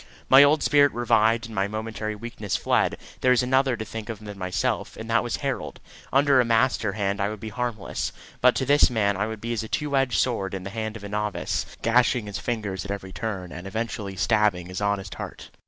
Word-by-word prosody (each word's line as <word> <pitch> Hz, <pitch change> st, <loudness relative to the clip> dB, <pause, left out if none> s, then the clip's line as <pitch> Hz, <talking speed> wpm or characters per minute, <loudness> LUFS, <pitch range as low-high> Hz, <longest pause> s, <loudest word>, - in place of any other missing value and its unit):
My 135 Hz, +1 st, +9 dB
old 145 Hz, +2 st, +5 dB
spirit 145 Hz, -1 st, +5 dB
revived, 115 Hz, -1 st, +2 dB
and 115 Hz, -, -9 dB
my 100 Hz, -1 st, 0 dB
momentary 110 Hz, 0 st, -4 dB
weakness 110 Hz, -2 st, -4 dB
fled. -, -, +1 dB, 0.2 s
There 130 Hz, -, +2 dB
was 125 Hz, 0 st, +4 dB
another 130 Hz, 0 st, +2 dB
to 110 Hz, -, -5 dB
think 110 Hz, +1 st, -7 dB
of 115 Hz, -, -4 dB
than 105 Hz, -1 st, -8 dB
myself, 90 Hz, -1 st, -2 dB
and -, -, -7 dB
that -, -, +4 dB
was -, -, -2 dB
Harold. -, -, -3 dB, 0.3 s
Under 135 Hz, -1 st, +5 dB
a -, -, +3 dB
master 115 Hz, -2 st, +2 dB
hand 100 Hz, -1 st, -1 dB
I 100 Hz, -, +1 dB
would 110 Hz, -1 st, -6 dB
be 110 Hz, -, -6 dB
harmless; 115 Hz, -2 st, -3 dB, 0.3 s
but 125 Hz, 0 st, +5 dB
to 130 Hz, -, 0 dB
this 145 Hz, +2 st, +5 dB
man 105 Hz, -4 st, +1 dB
I 105 Hz, +3 st, -1 dB
would 110 Hz, -1 st, -5 dB
be 115 Hz, +2 st, -3 dB
as 115 Hz, -, -1 dB
a 110 Hz, -, -6 dB
two 145 Hz, +4 st, -1 dB
edged 135 Hz, -2 st, +2 dB
sword 100 Hz, -6 st, 0 dB
in 95 Hz, -, -5 dB
the 100 Hz, -, -6 dB
hand 110 Hz, 0 st, -4 dB
of 105 Hz, -, -14 dB
a 100 Hz, -, -6 dB
novice 105 Hz, 0 st, -2 dB, 0.2 s
gashing 120 Hz, 0 st, +3 dB
his 100 Hz, -1 st, -5 dB
fingers 105 Hz, -6 st, -3 dB
at 100 Hz, -, -9 dB
every 100 Hz, -2 st, -5 dB
turn, 95 Hz, -1 st, -4 dB
and 90 Hz, +2 st, -7 dB
eventually 105 Hz, -1 st, -4 dB
stabbing 95 Hz, -3 st, +1 dB
his 90 Hz, +2 st, -5 dB
honest 100 Hz, -3 st, -1 dB
heart. -, -, -8 dB
110 Hz, 225 wpm, -25 LUFS, 100-120 Hz, 0.3 s, My